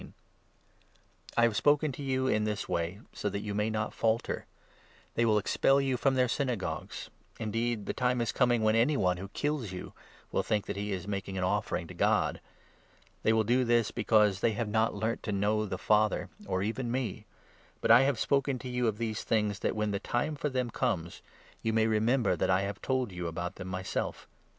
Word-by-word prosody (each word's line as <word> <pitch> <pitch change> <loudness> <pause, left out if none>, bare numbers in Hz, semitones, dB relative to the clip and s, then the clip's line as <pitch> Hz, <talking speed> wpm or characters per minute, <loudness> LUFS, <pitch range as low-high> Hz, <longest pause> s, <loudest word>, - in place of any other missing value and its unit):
I 120 - +5
have 115 -2 +3
spoken 145 +4 +3
to 135 - -8
you 130 -1 0
in 110 -4 +2
this 105 -1 -2
way 85 +5 -2
so 105 - -2
that 100 +1 -3
you 105 -1 -4
may 105 +2 0
not 110 -1 -2
falter, 115 +1 +1
i - - -9
j - - -25 0.7
They 115 - +2
will 110 -2 +4
expel 135 +6 +3
you 135 -2 +1
from 135 +2 +2
their 125 -1 +3
Synagogues; 125 -5 -3 0.3
indeed 115 0 -1
the - - -2
time 125 0 +1
2 120 - +1
is 115 - -1
coming 120 -3 +2
when 110 0 +4
any 130 +6 +3
one 90 -4 +2
who 95 +2 -6
kills 145 -1 -2
you 90 - -7 0.4
will - - +1
think 105 -2 0
that - - -4
he 100 +1 -3
is 95 -1 -4
making 100 -1 -3
an 95 - -1
offering 90 - 0
to - - -10
God. - - +1 0.8
They - - +3
will 110 0 +3
do 125 +4 +2
this, 120 -2 +2
because 105 -3 +3
they 110 +1 +2
3 - - -6
have 110 0 -2
not 110 +1 +1
learnt 110 +3 -1
to 105 - -3
know 105 +2 +1
the 95 - -3
Father, 105 +2 +2 0.2
or 95 +1 0
even 115 +4 -2
me. 120 -5 -3 0.5
But - - +2
I 120 +2 +9
have 135 -2 +2
4 - - -3
spoken 140 -1 +1
to 125 +1 -7
you 125 -1 0
of 105 -2 0
these 110 -1 -3
things 105 -3 0
that, - - -1
when 105 -1 0
the 100 - -1
time 150 +9 -1
for 150 +1 -2
them 125 -3 -1
comes, 85 -4 -2 0.4
you 110 - 0
may 110 0 +3
remember 110 -1 +2
that - - 0
I 95 +2 +2
told 130 -4 0
you 90 -1 -4
about 85 +2 -4
them 90 - -6
myself. 95 0 -3
110 Hz, 215 wpm, -30 LUFS, 100-125 Hz, 0.8 s, I